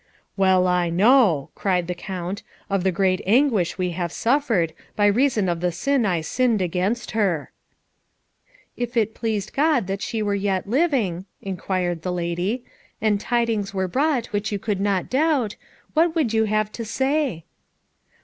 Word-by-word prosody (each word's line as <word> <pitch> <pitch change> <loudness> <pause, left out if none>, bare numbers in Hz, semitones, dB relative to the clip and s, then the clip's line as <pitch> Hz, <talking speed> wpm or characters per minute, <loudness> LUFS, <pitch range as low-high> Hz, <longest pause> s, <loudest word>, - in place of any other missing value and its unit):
"Well 190 -2 +4
I 180 -1 +2
know," 190 - +4
cried 180 -3 0
the 180 - -3
Count, 185 +1 -5 0.3
"of 195 -2 +1
the 190 - +2
great 185 +1 +1
anguish 225 - +3
we 180 -1 -1
have 170 0 -3
suffered, 225 - +1 0.2
by 205 - +2
reason 220 -1 +3
of 170 -1 -1
the 180 +1 0
sin 270 +5 +1
I 175 -4 0
sinned 235 +6 +1
against 185 +6 -1
her." 195 -9 0 1.2
"If 240 0 -4
it 220 -1 +2
pleased 215 -3 -3
God 295 -6 +2
that 195 +1 -3
she 220 -2 -2
were 205 -1 0
yet 195 -1 -1
living," 230 - +1 0.2
inquired 180 -2 -2
the 180 - -3
lady, 180 +7 -2 0.4
"and 210 -2 +1
tidings 225 -5 0
were 190 -1 0
brought 265 - +1
which 205 0 -1
you 205 - 0
could 200 -1 -2
not 195 -2 0
doubt, 270 -6 +1 0.4
what 325 +1 +3
would 280 -9 +1
you 220 0 +3
have 215 0 0
to 230 - -6
say?" 265 - -1
205 Hz, 160 wpm, -23 LUFS, 180-240 Hz, 1.2 s, Well